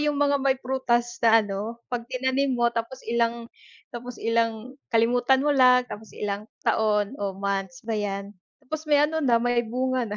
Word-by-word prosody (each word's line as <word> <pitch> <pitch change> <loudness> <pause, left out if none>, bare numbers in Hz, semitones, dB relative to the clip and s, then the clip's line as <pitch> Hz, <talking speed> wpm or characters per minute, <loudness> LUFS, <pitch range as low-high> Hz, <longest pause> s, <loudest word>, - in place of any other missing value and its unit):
yung 295 -1 +1
mga 285 -1 +2
may 270 0 +2
prutas 240 -2 -1
na 225 -1 +5
ano, 210 +4 -5
'pag 240 0 -3
tinanim 260 +2 0
mo 240 - +1
tapos 235 +3 -5
ilang 235 0 0 0.5
tapos 245 0 -7
ilang 230 +1 -1 0.2
kalimutan 245 +4 +3
mo 295 - +3
lang 250 -2 +5
tapos 220 -3 -10
ilang 205 +1 -4 0.2
taon 210 0 +1
o 195 -2 -3
months 195 -2 -3
ba 225 - -3
'yan, 200 -1 -3 0.3
tapos 310 +3 -6
may 295 0 +5
ano 320 +1 -1
na, 250 -6 +3
may 245 +1 +2
bunga 250 +1 -1
na. 210 - -4
235 Hz, 175 wpm, -25 LUFS, 220-260 Hz, 0.5 s, na